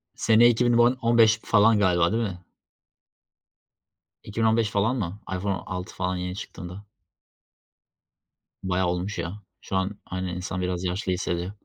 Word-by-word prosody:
Sene 115 +1 +5
iki 120 +1 +2
bin 120 -1 +3
on 120 +2 +4
on 115 0 +2
beş 110 -1 +5
falan 110 0 +4
galiba 90 -2 +3
değil 115 +1 0
mi? 90 -4 -6 1.8
2015 110 +1 +1
falan 105 +5 +1
mı? 100 -4 -4 0.2
iPhone 100 +2 -1
6 90 0 -6
falan 95 0 -2
yeni 90 0 -4
çıktığında. 95 +1 -8 1.8
Bayağı 95 -1 0
olmuş 90 +3 -2
ya. 85 +4 -5 0.2
Şu - - -5
an 95 +2 -1
aynen 95 -1 -4
insan 90 +1 -4
biraz 90 0 -2
yaşlı 90 +1 -2
hissediyor. 90 0 -2
95 Hz, 145 wpm, -25 LUFS, 90-110 Hz, 1.8 s, Sene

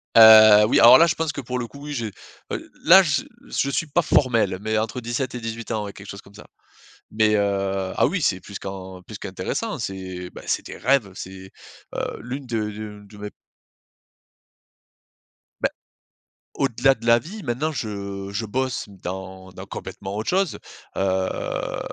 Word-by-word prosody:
Heu, 110 -1 +9
oui 110 - +3
alors 120 - +10
là 165 - +6
je 165 - +1
pense 160 -1 -1
que 140 - -6
pour 125 0 -4
le 120 - -4
coup, 140 +3 -13
oui, 150 - -5
je, 120 -5 -2 0.5
heu, - - -5
là - - +8
je - - 0 0.2
je 140 - -1
suis 150 +4 -1
pas 155 +4 +1
formel, 115 - +2
mais 110 +1 -1
entre 115 +3 -3
17 120 +2 -3
et - - -4
18 115 0 -6
ans 105 -2 -1
ouais, 100 - -7
quelque 100 0 -12
chose 100 -1 -8
comme 100 - -19
ça. 105 - -13 0.7
Mais, 110 0 +2
heu, 100 -2 0
ah - - +4
oui, 185 -3 -1
c'est 95 -9 +1
plus 100 +1 -9
qu'en 95 -1 -8
plus - - -10
qu'intéressant, - - -4
c'est 95 -2 -6
bah - - -11
c'est - - -1
des - - -8
rêves! 130 -7 +2
C'est 95 0 -9 0.5
heu, - - -3
l'une 130 +3 -6
de 115 -3 -1
de 105 -1 -8
de 100 +1 -16
mes 105 0 -6
p - - -38 2.3
Beh, - - +2 0.8
au-delà 135 0 +2
de 115 - -12
la 115 0 +6
vie, 200 - -9
maintenant 135 +6 -1
je 100 -5 -5
je 110 +3 -3
bosse 130 +3 -2
dans 95 0 -8
dans 90 - -9
complètement 95 +1 -7
autre 110 +1 -3
chose, 190 -2 0 0.4
heu. 95 -1 -1
110 Hz, 185 wpm, -23 LUFS, 100-125 Hz, 2.3 s, alors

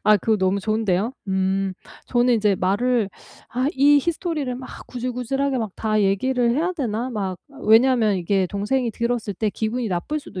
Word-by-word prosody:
아 210 0 +6
그거 220 +3 +1
너무 190 0 +1
좋은데요. 215 +1 0 0.2
음. 190 0 0 0.3
저는 245 0 +3
인제 210 -3 +2
말을 215 +4 +1 0.4
'아 255 +2 -1
이 285 +2 +5
히스토리를 320 -4 -2
막 255 - -10
구질구질하게 255 +2 -2 0.2
다 215 -1 0
얘기를 240 +5 +2
해야 335 +6 0
되나?' 245 -7 -2
막 195 -6 -3 0.3
왜냐하면 225 -2 +5
이게 190 +1 +1
동생이 220 +6 -1
들었을 235 -1 -2
때 215 +4 0
기분이 225 +3 -2
나쁠 190 - -2
수도 190 -9 -8
225 Hz, 340 characters per minute, -22 LUFS, 200-255 Hz, 0.4 s, 아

